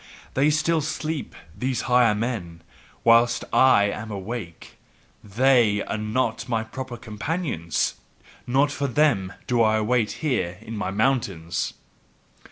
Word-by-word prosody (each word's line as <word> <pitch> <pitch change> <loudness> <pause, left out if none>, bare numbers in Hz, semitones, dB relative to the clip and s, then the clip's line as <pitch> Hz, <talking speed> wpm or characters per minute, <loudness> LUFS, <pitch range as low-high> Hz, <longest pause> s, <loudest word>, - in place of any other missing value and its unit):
they 140 +3 +3
still 155 +1 +2
sleep, 155 0 -4 0.2
these 125 -1 -1
higher 120 -3 +3
men, 100 -8 -4 0.4
whilst 115 +1 +4
I 130 -6 +6
am 105 +2 -3
awake: 100 -3 -7 0.4
THEY 115 -1 +3
are - - -4
not 115 +2 -2
my 115 -2 0
proper 125 +2 -7
companions! 115 - -2 0.5
Not 135 +4 +2
for 145 0 -2
them 125 -9 +2
do 120 -2 +1
I 110 -1 +3
wait 110 0 +1
here 90 - 0
in 115 0 -7
my 105 - -2
mountains. 100 -6 -1
115 Hz, 125 wpm, -24 LUFS, 105-130 Hz, 0.5 s, I